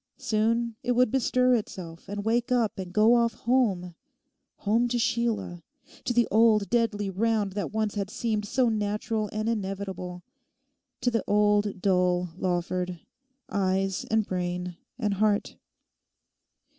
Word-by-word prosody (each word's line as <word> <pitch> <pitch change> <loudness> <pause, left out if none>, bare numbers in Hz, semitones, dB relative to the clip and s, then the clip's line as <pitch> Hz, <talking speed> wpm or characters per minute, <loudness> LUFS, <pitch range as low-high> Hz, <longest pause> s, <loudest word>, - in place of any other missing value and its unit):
Soon 230 +1 0
it 245 -2 0
would 250 -2 +3
bestir 255 -1 +3
itself 180 -8 -4
and 205 0 -4
wake 235 +2 +1
up 230 -5 +1
and 185 -2 -5
go 215 +4 +5
off 235 -1 +2
home—home 215 0 -1
to 240 0 -1
Sheila, 235 -7 -1 0.4
to - - 0
the 240 -1 +3
old 220 -2 +4
deadly 220 -4 +1
round 210 0 +1
that 200 +1 -3
once 215 -1 -1
had 200 -2 -3
seemed 215 -1 -2
so 250 +3 +2
natural 215 0 -1
and 215 +1 -2
inevitable, 190 -4 -4 0.8
to 245 0 +1
the 230 -3 0
old 205 -2 +2
dull 180 -2 +2
Lawford—eyes 190 +3 -2
and 220 -1 +2
brain 180 -1 -3 0.2
and 210 -5 0
heart. 205 +1 0
210 Hz, 130 wpm, -27 LUFS, 190-230 Hz, 0.8 s, go